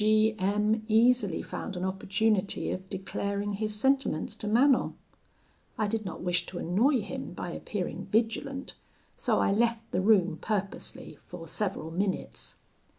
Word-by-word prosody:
G 215 +1 +4
M 210 +3 +1
easily 225 -4 +3
found 200 - -5
an 180 +1 -2
opportunity 195 +1 0
of 185 +1 -5
declaring 200 +1 -2
his 215 +1 -2
sentiments 265 - +1
to 210 - -4
Manon. 250 +5 +4 0.8
I 215 - +1
did 215 0 -2
not 185 - -5
wish 175 -1 0
to 180 - -7
annoy 230 - +2
him 265 +6 -6
by - - -5
appearing - - -4
vigilant, 235 +5 -1 0.4
so - - +1
I - - +3
left 230 +2 +1
the 180 - +1
room 185 -5 +4
purposely 200 -3 -3
for 170 -2 -8
several 180 -3 -3
minutes. 190 +3 -3
210 Hz, 145 wpm, -29 LUFS, 190-225 Hz, 0.8 s, G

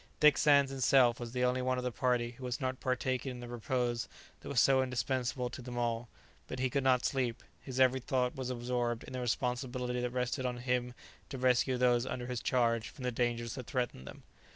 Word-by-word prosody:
Dick 150 -1 +7
Sands 140 -2 +4
himself 130 -2 +4
was 120 -1 -6
the 125 0 -1
only 125 +1 +2
one 130 0 0
of 125 - -2
the 125 - -1
party 120 -1 0
who 125 +2 -13
was 125 -1 -2
not 130 -1 -2
partaking 130 +1 -1
in 125 - -9
the 120 - -7
repose 120 0 -1 0.3
that - - -9
was 140 - +2
so 135 +2 +5
indispensable 125 +1 -1
to 130 - -7
them 120 0 -7
all; 120 -1 -1 0.4
but 130 - -5
he 130 0 0
could 140 0 0
not 130 -2 +3
sleep; 125 -4 -1 0.2
his 130 -1 -6
every 130 0 +5
thought 125 0 0
was 130 -1 -4
absorbed 120 -1 -1
in - - -10
the 130 - -3
responsibility 125 0 -1
that 125 - -1
rested 125 +1 -2
on 125 -1 -2
him 125 0 -1 0.3
to 135 - -5
rescue 125 0 +2
those 125 0 +3
under 125 -2 -4
his 125 -2 -3
charge 115 -3 +1
from 135 - -11
the 125 - 0
dangers 120 -1 -1
that 130 -3 -7
threatened 120 - -3
them. - - -10
125 Hz, 220 wpm, -33 LUFS, 120-130 Hz, 0.4 s, Dick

